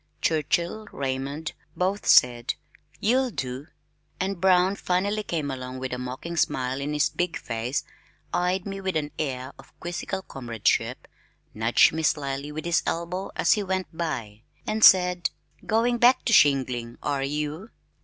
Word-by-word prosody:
Churchill, 170 +6 0
Raymond, 140 +3 -3 0.3
both 190 +3 -1
said, 120 -1 +5 0.4
"You'll 255 +5 +2
do," 130 - -5 0.5
and 190 -1 -2
Brown 185 0 +4
finally 200 +3 0
came 160 -8 -3
along 130 -1 -6
with 130 0 -4
a 125 - -3
mocking 130 +7 -5
smile 130 -3 0
on 145 +2 -2
his 150 0 +2
big 175 -1 -1
face, 115 +4 -3 0.5
eyed 180 +1 0
me 195 -1 -5
with 190 -2 -2
an 150 -1 -1
air 130 -3 -3
of - - -17
quizzical 175 +2 -4
comradeship, 120 - -1 0.5
nudged 115 +2 +4
me 160 - -2
slyly 145 -2 -1
with 155 +1 -6
his 170 -1 +2
elbow 175 +3 -2
as - - +4
he 210 - 0
went 185 -4 -3
by, 115 -11 -4 0.2
and 215 0 -1
said, 180 -1 +6 0.4
"Going 235 +2 +2
back 250 +1 +5
to 230 - +2
shingling, 125 - +3
are 140 -1 0
you?" 150 +8 -3
160 Hz, 150 wpm, -26 LUFS, 130-190 Hz, 0.5 s, said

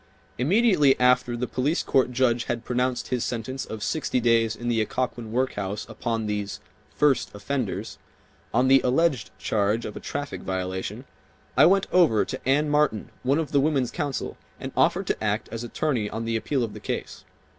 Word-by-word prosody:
Immediately 165 - +4
after 125 -1 +3
the 125 - -1
police 140 +6 0
court 130 -2 +2
judge 120 -2 +1
had 120 -1 -3
pronounced 125 0 -1
his 125 -2 0
sentence 125 +2 -3
of 110 -1 -6
sixty 150 -4 0
days 115 -2 +3
in 120 +2 -6
the 115 -2 +2
Occoquan 120 0 -3
workhouse 105 -5 -2
upon 115 0 -3
these 105 -1 -3 0.4
"first 145 -4 +2
offenders," 115 +1 -3 0.5
on 125 +3 +3
the 135 0 +6
alleged 130 -3 +2
charge 105 +2 0
of - - -6
a - - -5
traffic 145 0 -5
violation, 95 0 -4 0.5
I - - +7
went 195 +2 +4
over 165 - +4
to - - -5
Anne 150 +2 +3
Martin, 150 -8 +1
one 135 +3 +2
of 160 -2 -2
the 140 - +4
women's 135 -4 +1
counsel, 145 -2 -3 0.2
and - - -6
offered - - +2
to - - -2
act - - -1
as 115 0 -4
attorney 120 -3 -1
on 115 +1 -4
the 115 0 -1
appeal 120 +4 0
of 110 -3 -4
the - - -8
case. - - -5
125 Hz, 175 wpm, -25 LUFS, 110-140 Hz, 0.5 s, I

